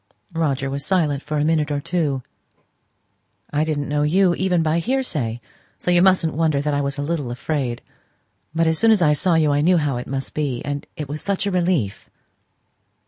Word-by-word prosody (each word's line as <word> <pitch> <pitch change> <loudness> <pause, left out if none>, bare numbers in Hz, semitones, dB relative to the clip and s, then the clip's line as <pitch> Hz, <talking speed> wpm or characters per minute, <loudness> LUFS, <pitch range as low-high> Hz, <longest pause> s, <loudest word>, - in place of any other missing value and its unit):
Roger 140 -5 0
was 140 +1 -3
silent 150 -5 +1
for 150 0 -3
a 145 - +1
minute 155 -1 +1
or 145 -1 -1
two. 145 -5 -1 1.3
"I 150 +1 +2
didn't 150 -2 -2
know 145 0 0
you, 175 +4 +3
even 180 -2 +1
by 160 +1 +1
hearsay. 165 - -1 0.4
So 180 - -1
you 175 0 +5
mustn't 185 -4 +3
wonder 155 -3 +1
that 145 +1 -1
I 145 - +1
was 140 +1 -3
a 145 - -2
little 145 -4 -2
afraid. 125 -1 -3 0.7
But 165 0 +2
as 160 -1 +1
soon 225 - +4
as 215 -5 +5
I 150 -2 +4
saw 170 +3 +2
you 155 -2 +3
I 145 0 +2
knew 175 +3 +4
how 145 -5 0
it 125 - -6
must 135 0 -4
be; 140 -5 -2
and 145 0 -4
it 150 - -4
was 150 +2 -5
such 200 0 -1
a 200 - 0
relief!" 175 - 0
150 Hz, 200 wpm, -21 LUFS, 140-170 Hz, 1.3 s, you